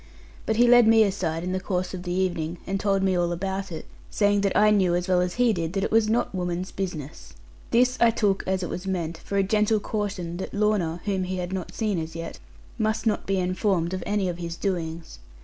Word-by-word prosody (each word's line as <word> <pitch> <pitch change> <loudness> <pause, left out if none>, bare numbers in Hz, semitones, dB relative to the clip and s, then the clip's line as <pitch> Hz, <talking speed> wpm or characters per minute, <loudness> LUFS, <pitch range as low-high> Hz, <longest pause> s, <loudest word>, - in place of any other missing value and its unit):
But 220 - +1
he 240 +2 +5
led 240 -1 +7
me 225 0 +7
aside 175 -5 -1
in 180 - -2
the 185 - -1
course 185 -1 -2
of 185 - -5
the 175 -1 -5
evening, 175 -2 -1
and 195 0 -2
told 195 -1 +1
me 190 -1 +2
all 175 -1 +1
about 190 +2 -3
it; 160 - -6 0.2
saying 205 -1 +2
that 200 -1 +1
I 210 +1 +5
knew, 185 -4 +3
as 175 +1 -1
well 180 -1 +3
as 180 0 -2
he 245 -2 +3
did, 170 -2 -3
that 195 -1 -1
it - - -1
was 225 -1 +3
not 230 -1 0
woman's 180 0 -3
business. 150 - -6 0.4
This 250 +2 +3
I 235 - +7
took, 205 -4 +1
as 190 0 0
it 175 - -3
was 185 +2 -5
meant, 170 -3 -2
for 200 - -4
a 195 - +4
gentle 215 +2 +2
caution 200 -5 -3
that 190 - -6
Lorna 205 -6 +1
(whom 190 -2 0
he 185 +1 -3
had 180 +1 -4
not 185 -3 -5
seen 210 -6 0
as 160 0 -6
yet) 165 0 -6 0.4
must 220 +1 0
not 215 -2 0
be 195 0 +1
informed 185 -1 0
of 185 - -3
any 205 -2 0
of 175 -1 -4
his 170 -1 -4
doings. 170 -4 -4
190 Hz, 235 wpm, -25 LUFS, 175-210 Hz, 0.4 s, led